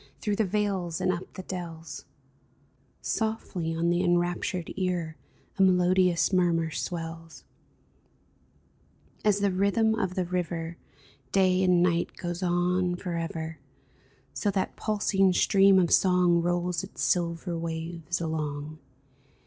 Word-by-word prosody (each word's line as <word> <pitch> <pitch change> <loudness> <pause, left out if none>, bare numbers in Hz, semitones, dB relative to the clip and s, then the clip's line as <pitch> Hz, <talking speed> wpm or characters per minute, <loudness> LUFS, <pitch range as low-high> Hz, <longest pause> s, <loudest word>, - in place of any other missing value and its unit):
Through 205 -2 -1
the 220 - +2
vales 190 -4 -1
and 185 - +1
up 175 0 -5
the 185 - -7
dells 170 -3 -7 0.5
— - - -38 0.2
Softly 190 -7 -2
on 170 +1 +1
the 175 +1 +1
enraptured 175 0 0
ear 175 -4 -2 0.4
A - - +4
melodious 180 -1 +3
murmur 170 -3 +2
swells! 165 0 -6 1.8
As 205 -1 +2
the 200 -1 +2
rhythm 200 +4 +2
of 190 -5 -2
the 185 -2 0
river 170 -2 -3 0.5
Day 185 -1 +3
and 180 -2 +4
night 170 -1 0
goes 175 0 -4
on 180 0 +1
forever, 165 -2 -4 0.7
So 205 - -1
that 195 -1 -1
pulsing 195 -3 +1
stream 195 +1 +5
of 175 -2 +3
song 180 -2 +4
Rolls 175 0 -1
its 190 - -6
silver 170 0 0
waves 165 +1 -4
along. 155 -2 -4
175 Hz, 125 wpm, -27 LUFS, 170-185 Hz, 1.8 s, stream